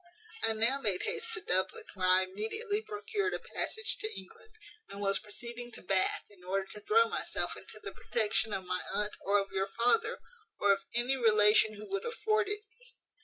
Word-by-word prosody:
"I 225 - +2
now 235 +5 +2
made 200 -7 0
haste 455 0 -2
to 425 - -6
Dublin, 185 +1 +1
where 185 -2 0
I 185 +1 +6
immediately 225 - -1
procured 415 -1 -2
a - - -3
passage 440 0 -2
to 435 - -3
England; 190 - -11 0.4
and 200 - -7
was 195 -1 +2
proceeding 235 +3 -7
to - - -8
Bath, 185 0 +1
in 190 -3 -18
order 190 +1 -1
to 210 - -5
throw 455 - +4
myself - - -2
into - - -10
the - - -6
protection 220 -1 0
of 190 -2 -3
my 180 0 -1
aunt, 210 0 0
or 200 +1 +4
of 200 0 -1
your 195 0 0
father, 430 - +3 0.4
or 200 -1 +5
of 195 - -2 0.2
any 245 +3 +2
relation 215 -2 +5
who 210 +1 -9
would 395 +1 -2
afford 440 -2 +1
it 415 0 -1
me. 465 +3 -20
220 Hz, 195 wpm, -32 LUFS, -, 0.4 s, I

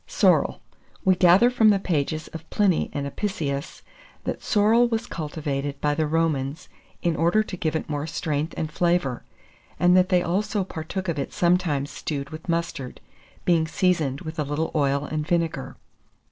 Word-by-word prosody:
[Illustration: - - -11
SORREL.] - - +4
SORREL. - - -23 0.4
We 190 -1 +5
gather 185 +7 +6
from 225 -3 +5
the 205 - +5
pages 155 -4 -1
of 160 0 -10
Pliny 200 -5 +2
and 140 -1 -3
Apicius, 140 -4 -3 0.4
that - - -3
sorrel 225 +3 +4
was 230 0 -1
cultivated 145 - -4
by 150 0 +1
the 155 +1 0
Romans 155 -1 -1 0.3
in 170 -2 +1
order 170 +7 +3
to 200 - -6
give 160 -3 -2
it 160 - -2
more 145 0 -3
strength 155 -1 -2
and 155 -1 -2
flavour, 170 -7 +1 0.6
and 180 0 +5
that 185 0 +4
they 180 -2 +3
also 205 +3 0
partook 185 +2 -5
of 165 -4 -1
it - - -3
sometimes 170 -6 +1
stewed 145 0 -4
with 155 +3 -9
mustard, 165 -6 -2 0.5
being 165 -2 +3
seasoned 160 -6 +1
with 160 0 -6
a - - +2
little 150 +3 -2
oil 140 -1 +1
and 150 0 -3
vinegar. 165 -6 -1
160 Hz, 175 wpm, -24 LUFS, 145-180 Hz, 0.6 s, gather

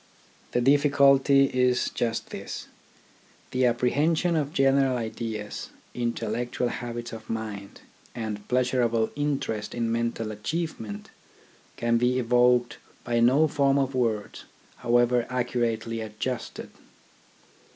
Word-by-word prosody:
The 120 - +2
difficulty 140 0 +5
is 125 -1 +2
just 115 -1 -2
this: - - -6 0.9
the 130 0 +2
apprehension 150 +8 +1
of 150 -2 0
general 135 -3 +3
ideas, 110 -2 -5 0.2
intellectual 120 +1 -2
habits 120 -1 -5
of 110 -1 -9
mind, 105 -3 -5 0.3
and 110 -3 -5
pleasurable 125 -3 +1
interest 140 -7 -2
in 115 -1 -1
mental 115 -1 -1
achievement 110 -3 -4 0.7
can 115 0 +2
be 125 +1 +2
evoked 125 0 +3 0.2
by 120 -1 0
no 130 +7 +5
form 140 -2 +2
of 135 -1 0
words, 115 -5 -2 0.3
however 120 0 +2
accurately 120 -2 -1
adjusted. 110 +3 -5
120 Hz, 105 wpm, -26 LUFS, 115-135 Hz, 0.9 s, difficulty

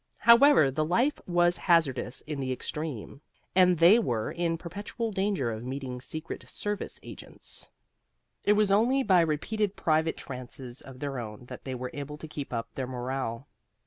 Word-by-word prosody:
However, 235 - +7
the 155 +4 0
life 235 - +1
was 175 0 +3
hazardous 135 -7 +2
in 150 -2 -5
the 130 -1 -2
extreme, 140 -1 -5 0.3
and 180 -1 +5
they 175 +8 +7
were 120 - -1
in 170 -1 -1
perpetual 205 +7 -5
danger 190 - 0
of 110 +1 -5
meeting 130 -1 -5
secret 155 +4 -6
service 205 -1 -4
agents. - - -9 0.7
It 205 - +5
was 210 -1 +3
only 245 +7 +4
by 185 -6 +5
repeated 195 +6 0
private 160 0 +1
trances 125 -1 -7
of 130 -1 -12
their 140 -3 -3
own 110 +1 -7
that 125 - -9
they 130 -1 -3
were 125 0 -5
able 145 +1 -6
to 160 - -8
keep 145 -2 -6
up 115 -2 -4
their 130 -2 -3
morale. 130 0 -4
155 Hz, 165 wpm, -28 LUFS, 130-190 Hz, 0.7 s, However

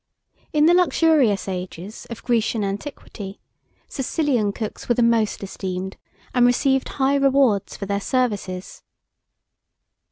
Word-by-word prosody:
In 300 0 +4
the 340 - +6
luxurious 320 - +3
ages 185 +2 -6
of 235 - -8
Grecian 225 -2 +1
antiquity, 200 -1 -6 0.5
Sicilian 265 -6 0
cooks 215 +3 -6
were 240 - +4
the 240 - +3
most 230 -3 +2
esteemed, 190 -1 -4 0.4
and 245 - +4
received 265 +2 +3
high 270 0 +1
rewards 270 -7 +2
for 200 - -4
their 200 +1 -1
services. 200 -7 -2
230 Hz, 120 wpm, -22 LUFS, 200-270 Hz, 0.5 s, the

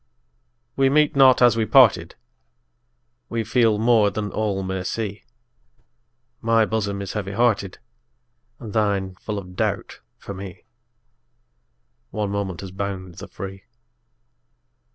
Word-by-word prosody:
We 135 -1 +3
meet 150 +1 +3
not 130 -2 +6
as 120 -3 +6
we 110 -1 0
parted, 110 -9 +5 1.1
We 115 -1 -2
feel 110 -1 +2
more 110 -2 +4
than 105 0 -4
all 100 -3 -2
may 95 0 -3
see; 105 0 -4 1.2
My 115 -1 +3
bosom 100 -2 -2
is 95 - -6
heavy 100 -2 -4
hearted, 105 -4 +1 0.8
And 110 -4 -8
thine 100 -3 0
full 105 +1 -5
of 90 -2 -8
doubt - - -2 0.2
for 100 - -8
me: 95 -2 -9 1.5
One 105 -2 -3
moment 100 -4 -3
has 95 -2 -8
bound 95 -2 -5
the - - -8
free. 95 0 -9
105 Hz, 125 wpm, -22 LUFS, 95-115 Hz, 1.5 s, not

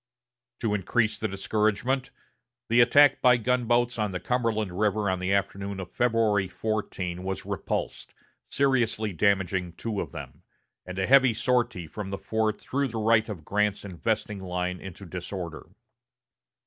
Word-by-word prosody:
To 110 -3 0
increase 105 +3 0
the 110 - -1
discouragement, 110 +6 0 0.6
the 120 +2 +6
attack 140 +4 +6
by 125 -1 +6
gunboats 120 0 +1
on 105 -1 +1
the 90 -1 -4
Cumberland 115 -5 0
River 105 -1 +1
on 95 - -1
the 95 +1 -1
afternoon 100 0 -1
of 90 -2 -7
February 110 -5 +2
14 95 -4 -3
was 95 0 -4
repulsed, - - -3 0.4
seriously 120 -6 +1
damaging 95 -1 +1
two 110 +2 -3
of 75 - -6
them, - - -9 0.5
and 90 0 -6
a 95 - +1
heavy 130 -2 +5
sortie 120 -5 0
from 95 +5 -6
the 100 - -3
fort 110 0 -1
threw 140 +1 -1
the 115 -2 -6
right 110 0 +3
of 85 -8 -7
Grant's 105 0 0
investing 105 +2 -2
line 90 -1 -3
into 95 +1 -9
disorder. 90 -1 -6
105 Hz, 150 wpm, -27 LUFS, 95-115 Hz, 0.6 s, the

